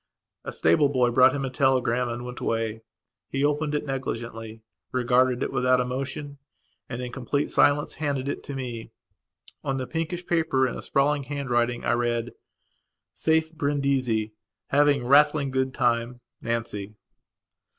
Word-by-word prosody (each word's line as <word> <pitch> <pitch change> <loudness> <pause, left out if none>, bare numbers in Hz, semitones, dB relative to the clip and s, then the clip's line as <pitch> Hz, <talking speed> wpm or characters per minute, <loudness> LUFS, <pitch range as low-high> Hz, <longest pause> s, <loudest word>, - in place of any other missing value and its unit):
A - - -5
stable 85 - +3
boy 125 -3 +2
brought 130 +2 +6
him 135 -1 -2
a 130 - -4
telegram 125 -3 +2
and 120 +1 -5
went 125 0 -7
away. 115 -1 -2 0.5
He 135 +1 0
opened 150 0 0
it 150 - -2
negligently, 115 -4 -5 0.3
regarded 125 0 +2
it - - -3
without 125 0 +3
emotion, 135 +3 -4 0.5
and, 120 +2 -4
in 125 - -5
complete 140 +3 -2
silence, 145 +1 +3
handed 140 -3 -2
it - - -3
to 140 - -6
me. 120 -4 -5 0.7
On 135 - -1
the 130 - -3
pinkish 165 +4 -3
paper 160 -7 +2
in 125 - -4
a - - -6
sprawled 140 0 +1
handwriting 120 -4 -1
I - - +2
read: 120 0 -1 0.8
"Safe 160 0 +1
Brindisi. 140 -7 0 0.4
Having 145 -2 +3
rattling 145 +1 +4
good 130 0 0
time. 120 0 0 0.2
Nancy." 110 -3 -3
130 Hz, 145 wpm, -26 LUFS, 120-145 Hz, 0.8 s, brought